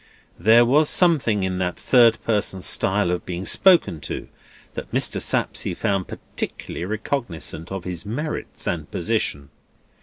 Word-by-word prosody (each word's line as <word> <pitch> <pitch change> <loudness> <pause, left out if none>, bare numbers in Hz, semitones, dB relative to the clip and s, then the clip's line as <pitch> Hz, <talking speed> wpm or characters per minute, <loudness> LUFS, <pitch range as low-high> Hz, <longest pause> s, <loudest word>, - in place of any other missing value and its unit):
There 115 +6 +6
was 145 +5 +3
something 140 - +3
in 95 -1 -2
that 90 -1 -2
third 115 -3 +5
person 100 -4 -1
style 95 -2 +1
of 90 -1 -2
being 90 +1 -5
spoken 175 - +4
to, - - -6 0.4
that - - -7
Mr. - - 0
Sapsea 90 - -1
found 100 -3 -1
particularly 85 - -6
recognisant 100 - -4
of 95 -2 -4
his 90 -2 -4
merits 150 +9 -5
and - - -3
position. 70 0 -2
100 Hz, 140 wpm, -22 LUFS, 90-120 Hz, 0.4 s, There